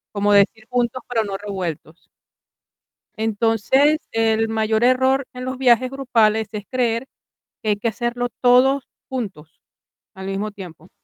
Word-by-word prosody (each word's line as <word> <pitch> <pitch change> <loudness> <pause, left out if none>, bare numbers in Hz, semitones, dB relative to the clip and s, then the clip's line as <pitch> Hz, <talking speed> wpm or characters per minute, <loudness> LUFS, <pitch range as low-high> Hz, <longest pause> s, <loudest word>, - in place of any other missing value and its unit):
como 205 0 +1
decir, 210 +2 +3
juntos, 245 0 -1
pero 225 -3 0
no 195 - -4
revueltos. 180 -5 -6 1.0
Entonces, 225 +7 +2
el 225 0 +1
mayor 220 0 0
error 260 +2 +3
en 250 0 -7
los 260 0 -4
viajes 255 -1 +3
grupales 225 -5 +1
es 210 -2 -6
creer 240 -1 0 0.6
que 215 - -2
hay 210 - +3
que 220 - -2
hacerlo 240 +2 -2
todo 255 +3 +5 0.3
juntos, 200 -12 -6 0.5
al 190 -1 -8
mismo 200 +2 -3
tiempo. 180 -4 -11
225 Hz, 135 wpm, -21 LUFS, 205-250 Hz, 1.0 s, todo